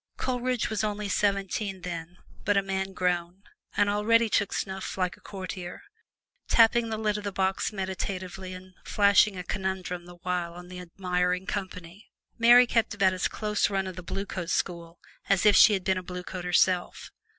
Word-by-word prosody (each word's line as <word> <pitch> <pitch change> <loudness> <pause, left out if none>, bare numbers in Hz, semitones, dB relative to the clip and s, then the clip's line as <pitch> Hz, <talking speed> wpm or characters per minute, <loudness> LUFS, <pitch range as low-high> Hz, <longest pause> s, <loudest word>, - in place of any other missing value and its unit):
Coleridge 250 -1 -1
was 220 0 -1
only 210 -1 -2
seventeen 195 -1 -1
then, 170 0 -6 0.3
but 205 0 +2
a 195 - +3
man 190 0 -3
grown, 180 +1 -1 0.3
and 205 - +4
already 220 +3 +3
took 205 - +1
snuff 190 0 -4
like 180 -2 -1
a - - -25
courtier, 185 -2 -7 0.6
tapping 230 0 +4
the 220 - -2
lid 210 -1 0
of - - -9
the 200 - -3
box 190 +2 0
meditatively 190 -1 -4
and 185 0 -12
flashing 200 -1 +4
a 180 - -4
conundrum 190 -2 -3
the 175 - -12
while 175 -2 -2
on 180 0 -11
the 180 0 -8
admiring 180 0 -1
company. 185 -1 -6 0.3
Mary 240 +2 +8
kept 230 -3 0
about 195 -2 +3
as 185 - 0
close 210 -1 0
run 195 -1 -1
of 185 -1 -6
the 180 - -7
Blue 195 +3 -4
Coat 180 -3 -5
School 170 -1 -2 0.3
as 195 0 +3
if 210 -1 +6
she 215 - +8
had 190 -2 -1
been 190 0 +1
a - - -9
Blue 180 0 -6
Coat 180 -1 -6
herself. 180 0 +1
190 Hz, 185 wpm, -27 LUFS, 180-205 Hz, 0.6 s, Mary